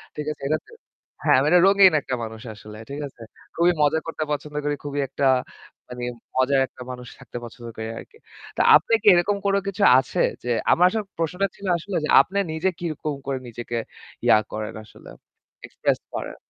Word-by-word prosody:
ঠিক 150 - -4
আছে? - - -24
এটাতে 155 - -2 0.5
হ্যাঁ, - - +5
আমি 145 - +1
একটা 180 0 +6
রঙীন 195 -3 +6
একটা 130 -1 -3
মানুষ 110 0 -7
আসলে, 105 0 -12
ঠিক 140 +1 -6
আছে? 120 - -18 0.3
খুবই 175 +1 +4
মজা 150 +2 +3
করতে 165 -1 -3
পছন্দ 150 0 -4
করি। 145 0 0
খুবই 145 0 -4
একটা 135 +2 -2 0.6
মানে 125 0 -7 0.3
মজার 130 +1 +3
একটা - - -16
মানুষ 125 -1 -8
থাকতে 125 -2 -9
পছন্দ 120 0 -10
করি 110 0 -4
আরকি। 450 - -14 0.4
তো - - +3
আপনি - - +3
কি - - -4
এরকম 185 +4 +2
কোনো 200 0 +3
কিছু 200 +1 -1 0.2
আছে 130 - -4 0.2
যে 125 - -4 0.2
আমার 180 - +5
আসলে 215 +2 -2
প্রশ্নটা 180 +4 0
ছিল 200 - -11
আসলে 185 +3 -6
যে - - -5
আপনি 200 +8 -3
নিজে 160 +4 0
কিরকম 155 -3 -3
করে 135 -1 -1
নিজেকে 120 0 -5 0.5
ইয়া - - +7
করেন 110 0 -5
আসলে? - - -15 0.6
এক্সপ্রেস - - -1
করেন? - - -5
150 Hz, 185 wpm, -23 LUFS, 125-180 Hz, 0.6 s, ইয়া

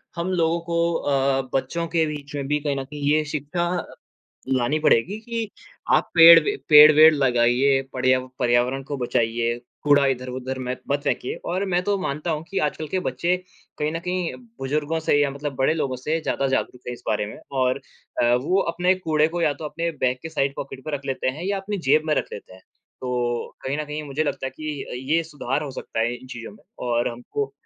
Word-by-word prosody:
हम 170 +1 -2
लोगों 170 -2 +1
को 170 0 0
अ, 135 -3 +1
बच्चों 170 +5 -1
के 165 -1 +1
बीच 145 -1 -6
में 140 -1 -3
भी 150 +1 +1
कहीं 145 -1 -1
न - - -3
कहीं 145 +2 -9
ये 155 0 +3
शिक्षा 150 +4 -2 0.9
लानी 130 +4 +1
पड़ेगी 155 - +2
कि, 230 -1 -4 0.4
"आप - - +3
पेड़ 165 0 +10
वे 415 0 0
पेड़-वेड़ 155 +1 +9
लगाइए, 130 0 +3
पर्या 130 0 +3 0.2
पर्यावरण 125 +2 +2
को 145 - -1
बचाइए, 120 -1 0 0.3
कूड़ा 145 -1 +5
इधर-उधर 130 0 -3
में 130 - -5
मेत 125 0 -3
मत 140 +1 +1
फेंकिए।" 125 - -1 0.2
और 185 +2 0
मैं 180 -1 +1
तो 205 +2 +1
मानता 155 -1 -3
हूँ 155 -1 -2
कि 195 - -2
आजकल 155 +1 -4
के 190 - -1
बच्चे 170 +8 0 0.4
कहीं 150 0 0
न 165 - -2
कहीं 180 0 -2 0.2
बुज़ुर्गों 150 +4 -1
से 160 - +1
या 145 -1 +2
मतलब 140 +1 -5
बड़े 135 +4 +3
लोगों 135 -5 -2
से 155 +6 -2
ज़्यादा 140 -3 -1
जागरूक 130 -1 -1
हैं - - -2
इस 120 - -15
बारे 105 -1 0
में 105 - -9 0.2
और 130 +2 +1 0.4
अ, 120 0 +4
वो 165 +11 +1
अपने 180 +2 +2
कूड़े 155 -4 +1
को 170 +1 -3
या 155 -3 +3
तो - - -5
अपने 165 +3 -2
बैग 125 0 +2
के 160 - -5
साइड 140 -3 -1
पॉकेट 135 -1 -7
पे 155 - -4
रख 140 0 -12
लेते 135 -1 -1
हैं 150 +7 -4
या 200 +1 0
अपनी 205 +1 -4
जेब 155 +2 +5
में 155 - +2
रख - - -1
लेते 100 - -9
हैं। 95 - -15 0.4
तो 120 -2 -2
कहीं 135 +2 -2
न 150 - -2
कहीं 150 +1 -5
मुझे 145 +1 -2
लगता 140 -2 -2
है - - -4
कि 155 -2 -4
अ, - - -9
ये 140 +7 0
सुधार 145 -2 -3
हो 145 - -5
सकता 115 - -4
है 120 +2 +1
इन 130 +1 -14
चीज़ों 120 -3 -8
में 205 - -19 0.2
और 120 0 +1
हमको 130 +3 -4
145 Hz, 215 wpm, -23 LUFS, 130-165 Hz, 0.9 s, पेड़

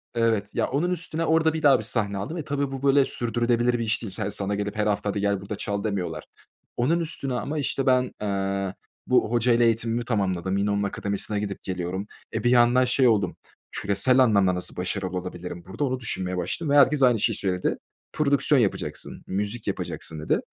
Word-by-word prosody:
Evet 110 -3 +1
ya - - +1
onun 165 +7 0
üstüne 165 -2 -3
orada 160 0 +3
bir 160 - -3
daha 135 -4 +6
bir - - -5
sahne 105 -4 -2
aldım 150 - -4
ve 155 - -3
tabii 140 -1 -2
bu 135 0 -6
böyle 140 0 +5
sürdürülebilir 120 0 0
bir - - -1
iş 110 +1 0
değil. 100 -5 -6
Se 100 +2 -3
sana 100 0 -2
gelip 105 +1 -3
her 105 0 0
hafta, 105 0 0
hadi 100 0 -2
gel 100 -1 0
burada 100 +1 -5
çal 100 0 -3
demiyorlar. 100 -4 -3 0.5
Onun 155 +8 +2
üstüne 140 -5 -3
ama 140 +5 -3
işte 135 -1 -1
ben 130 -1 +3
eee 100 -1 -1 0.3
bu - - +3
hocayla 120 0 +3
eğitimimi 115 +1 0
tamamladım. 95 -4 0
Yine 100 +1 +1
onun 100 0 0
akademisine 100 +1 -2
gidip 100 -1 -5
geliyorum. 95 +2 -3 0.3
E 110 -1 -2
bir 120 - +3
yandan 125 +1 +5
şey 125 +1 +3
oldum 100 -6 +2 0.4
küresel 100 +6 +3
anlamda 100 -7 +4
nasıl 90 - -4
başarılı 95 0 -2
olabilirim 90 -1 -6
burada 95 +10 -4
onu 130 -2 -1
düşünmeye 95 -6 -2
başladım 140 - -2
ve - - +6
herkes 140 0 +5
aynı 120 -4 +5
şeyi - - +1
söyledi. 90 -2 -1 0.4
Prodüksiyon 140 -2 +3
yapacaksın, 105 - -3
müzik 105 +4 -3
yapacaksın 80 -1 -4
dedi. 75 - +1
110 Hz, 195 wpm, -25 LUFS, 100-130 Hz, 0.5 s, daha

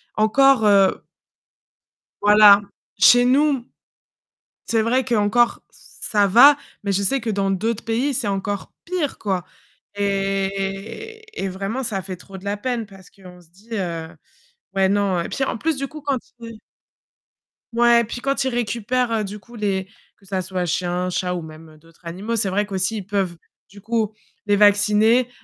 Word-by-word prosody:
encore, 225 +2 +4
heu 195 -2 +4 1.2
Voilà, 205 0 +7 0.4
chez 245 +5 +6
nous 270 -1 +2 1.0
C'est 225 -1 +1
vrai 250 +3 +1
qu'encore 235 0 +2
ça 205 -2 -1
va, 260 +9 +7 0.3
mais 200 - -2
je 200 - 0
sais 270 +8 +1
que 225 -1 -3
dans 195 -1 0
d'autres 215 +4 -2
pays, 245 +5 -1
c'est 240 -3 -1
encore 200 0 -3
pire, 340 -5 -3
quoi. 190 -4 -2 0.5
Et 195 - -3 0.2
et - - -1
vraiment 195 +7 -4
ça 195 -5 -2
fait 185 0 -7
trop 190 +2 -12
de 190 - -15
la 200 +1 -2
peine 235 +1 -3
parce 195 -2 -16
qu'on 180 -2 -15
se 170 - -22
dit, 195 +6 -23
heu 170 -5 -3 0.7
ouais, 190 0 +2
non 200 -2 +1
et 170 - -4
puis 270 - -2
en 230 - -3
plus 320 +1 -1
du 275 - -3
coup 305 +2 -10
quand 280 -2 -1 0.2
ils 230 -1 -9 1.2
Ouais, 235 0 +4
puis 235 +2 -6
quand 275 +1 0
ils 265 - 0
récupèrent, 240 +1 -1
heu, 220 -2 0
du 205 +1 -6
coup 235 +3 -16
les 195 -3 -2 0.3
que 195 - -24
ça 190 -1 -2
soit 185 0 -3
chiens, 180 +1 -1
chats 180 0 -2
ou 175 - -4
même 155 0 -13
d'autres 165 +1 -23
animaux, 195 +7 -4
c'est 210 -3 +1
vrai 205 +2 0
qu'aussi 195 +2 -1
ils 195 - -6
peuvent, 190 -3 -2 0.3
du 200 +1 -14
coup 220 0 -1 0.4
les 205 - +3
vacciner, 210 +4 +4
205 Hz, 170 wpm, -21 LUFS, 195-235 Hz, 1.2 s, Voilà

